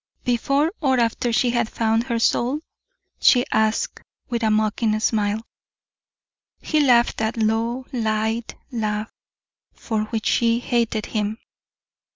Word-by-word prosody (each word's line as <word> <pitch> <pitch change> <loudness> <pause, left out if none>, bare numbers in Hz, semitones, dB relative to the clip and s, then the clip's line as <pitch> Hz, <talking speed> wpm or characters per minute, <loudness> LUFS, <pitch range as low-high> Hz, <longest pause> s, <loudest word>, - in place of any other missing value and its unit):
"Before 275 +6 +1
or 265 -4 +2
after 235 +1 0
she 240 +1 +2
had 235 -2 0
found 225 +1 0
her 235 -3 -1
soul?" 250 +5 +1 0.6
she 245 -1 +5
asked, 220 0 0 0.3
with 235 -1 -2
a 220 - +2
mocking 215 0 +1
smile. 215 0 0 1.2
He 310 - 0
laughed 245 -5 +4
that 220 +1 -1
low, 230 +3 0
light 220 0 -1 0.2
laugh 215 -2 -2 0.6
for 220 -2 -2
which 220 0 -4
she 230 -1 +3
hated 235 -3 -1
him. 215 0 -2
230 Hz, 125 wpm, -22 LUFS, 220-240 Hz, 1.2 s, she